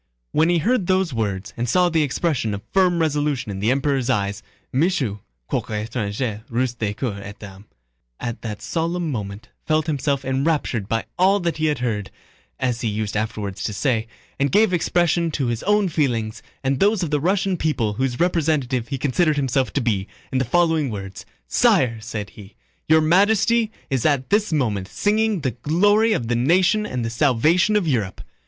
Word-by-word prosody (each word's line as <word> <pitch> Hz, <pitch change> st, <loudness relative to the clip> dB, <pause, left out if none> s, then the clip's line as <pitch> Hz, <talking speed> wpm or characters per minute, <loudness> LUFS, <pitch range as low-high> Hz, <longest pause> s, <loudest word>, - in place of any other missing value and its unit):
When 160 Hz, +2 st, +3 dB
he 175 Hz, -, +3 dB
heard 205 Hz, +3 st, +1 dB
these 185 Hz, -5 st, +1 dB
words 105 Hz, -3 st, -3 dB
and 120 Hz, 0 st, -2 dB
saw 180 Hz, +5 st, +4 dB
the 165 Hz, -2 st, +2 dB
expression 140 Hz, -6 st, 0 dB
of 100 Hz, -, -8 dB
firm 185 Hz, -3 st, +3 dB
resolution 150 Hz, -7 st, 0 dB
in 95 Hz, -, -5 dB
the 105 Hz, +3 st, +1 dB
Emperor's 135 Hz, -1 st, +1 dB
eyes, 100 Hz, -4 st, 0 dB, 0.3 s
Michaud—quoique 110 Hz, -, -2 dB
étranger, 110 Hz, -1 st, -3 dB
russe 120 Hz, +1 st, 0 dB
de 110 Hz, -4 st, -3 dB
cœur 110 Hz, -4 st, -3 dB
et 100 Hz, +1 st, -9 dB
d'âme,—at 95 Hz, -, -10 dB
that 110 Hz, -1 st, -6 dB
solemn 165 Hz, +5 st, -1 dB
moment 105 Hz, -1 st, -6 dB, 0.2 s
felt 155 Hz, 0 st, +2 dB
himself 140 Hz, -3 st, -1 dB
enraptured 130 Hz, -5 st, 0 dB
by 115 Hz, 0 st, -1 dB
all 195 Hz, +2 st, +4 dB
that 170 Hz, -2 st, -1 dB
he 155 Hz, 0 st, +1 dB
had 150 Hz, -, +1 dB
heard 105 Hz, -4 st, -2 dB, 0.5 s
(as 125 Hz, -2 st, -1 dB
he 115 Hz, -, -1 dB
used 105 Hz, 0 st, -2 dB
afterwards 105 Hz, -2 st, -3 dB
to 105 Hz, -, -2 dB
say), 115 Hz, +1 st, 0 dB, 0.3 s
and 140 Hz, -1 st, +1 dB
gave 210 Hz, +1 st, +4 dB
expression 170 Hz, -1 st, +2 dB
to 145 Hz, -4 st, -2 dB
his 120 Hz, -1 st, -2 dB
own 210 Hz, 0 st, +3 dB
feelings 120 Hz, -10 st, -1 dB, 0.2 s
and 135 Hz, 0 st, 0 dB
those 205 Hz, -1 st, +3 dB
of 160 Hz, -, -3 dB
the 150 Hz, -, +2 dB
Russian 190 Hz, +4 st, +1 dB
people 150 Hz, -10 st, 0 dB
whose 125 Hz, +1 st, -2 dB
representative 150 Hz, -8 st, +1 dB
he 140 Hz, -, -3 dB
considered 150 Hz, +4 st, +1 dB
himself 135 Hz, -2 st, 0 dB
to 140 Hz, -, 0 dB
be, 105 Hz, -5 st, 0 dB, 0.2 s
in 130 Hz, -, +1 dB
the 130 Hz, -, 0 dB
following 160 Hz, +1 st, +2 dB
words: 95 Hz, -3 st, -7 dB, 0.2 s
"Sire!" 115 Hz, -, +3 dB
said 110 Hz, -4 st, -5 dB
he, 100 Hz, +1 st, -14 dB, 0.3 s
"Your 160 Hz, 0 st, +6 dB
Majesty 210 Hz, +7 st, +3 dB, 0.2 s
is 130 Hz, -3 st, 0 dB
at 140 Hz, -2 st, +1 dB
this 210 Hz, -1 st, +2 dB
moment 110 Hz, -11 st, 0 dB
signing 210 Hz, -, +1 dB
the 130 Hz, -3 st, 0 dB
glory 205 Hz, -, +2 dB
of 120 Hz, -, -2 dB
the 120 Hz, -, 0 dB
nation 185 Hz, -, +3 dB
and 125 Hz, -, -3 dB
the 115 Hz, -, -3 dB
salvation 150 Hz, -, +3 dB
of 200 Hz, -5 st, +2 dB
Europe!" 110 Hz, -10 st, -1 dB
135 Hz, 180 wpm, -22 LUFS, 110-170 Hz, 0.5 s, Your